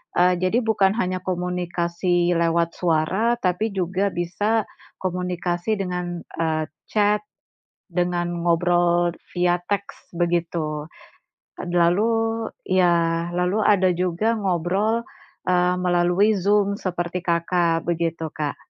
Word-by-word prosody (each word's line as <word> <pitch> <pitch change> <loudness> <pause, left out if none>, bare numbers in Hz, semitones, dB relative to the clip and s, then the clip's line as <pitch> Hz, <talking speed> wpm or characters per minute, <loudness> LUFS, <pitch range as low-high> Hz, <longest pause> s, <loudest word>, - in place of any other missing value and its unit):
eee, 180 0 +3
jadi 185 +7 +1
bukan 210 -3 +2
hanya 185 -4 -1
komunikasi 175 -1 -1
lewat 170 0 +1
suara, 180 +8 +1
tapi 190 +4 0
juga 190 +2 0
bisa 205 +6 0 0.4
komunikasi 180 +2 -1
dengan, 180 -3 -4 0.2
eee, 160 -1 0 0.2
chat 210 0 +2 0.7
dengan 175 -1 -1
ngobrol 175 0 +2 0.2
via 175 -1 +2 0.2
teks 200 0 -4
begitu. 170 -3 -1 0.8
Lalu, 175 +6 +3 0.6
ya 170 -2 +2
lalu 180 +4 0
ada 190 -3 +4
juga 185 +6 0
ngobrol, 200 +4 0 0.4
eee, 180 0 +3
melalui 180 +4 +3
Zoom 200 +1 +2
seperti 175 -2 -3
Kakak 170 -1 +1
begitu, 165 -1 -1
Kak. 150 -2 -2
180 Hz, 105 wpm, -23 LUFS, 170-190 Hz, 0.8 s, ada